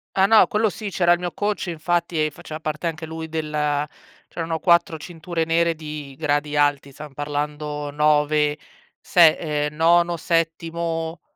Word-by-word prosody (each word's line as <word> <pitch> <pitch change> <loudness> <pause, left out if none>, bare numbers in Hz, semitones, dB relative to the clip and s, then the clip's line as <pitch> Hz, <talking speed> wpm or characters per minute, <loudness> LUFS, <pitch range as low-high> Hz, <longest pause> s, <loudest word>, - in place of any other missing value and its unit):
Ah 190 - +5
no, 220 +2 +6
quello 215 +1 +1
sì. 205 +3 -6
C'era 175 -2 +2
il 175 - -1
mio 175 -1 -3
coach, 205 +3 -2
infatti, 170 -1 -1
e 155 - -2
faceva 155 +2 -9
parte 155 +2 -3
anche 165 0 -4
lui 160 0 -7
della 150 -2 -1 0.4
c'erano 165 -1 -3
4 170 -2 +3
cinture 165 +1 -4
nere 165 +1 +2
di 150 -3 -8
gradi 145 -1 -1
alti, 145 -1 +1
stan 150 +1 -11
parlando 145 0 -4
9, 150 0 +2 0.4
se 165 -3 +5 0.3
ehm, 150 - -9
nono, 170 +2 +3
settimo, 165 0 -2
160 Hz, 155 wpm, -22 LUFS, 150-170 Hz, 0.4 s, no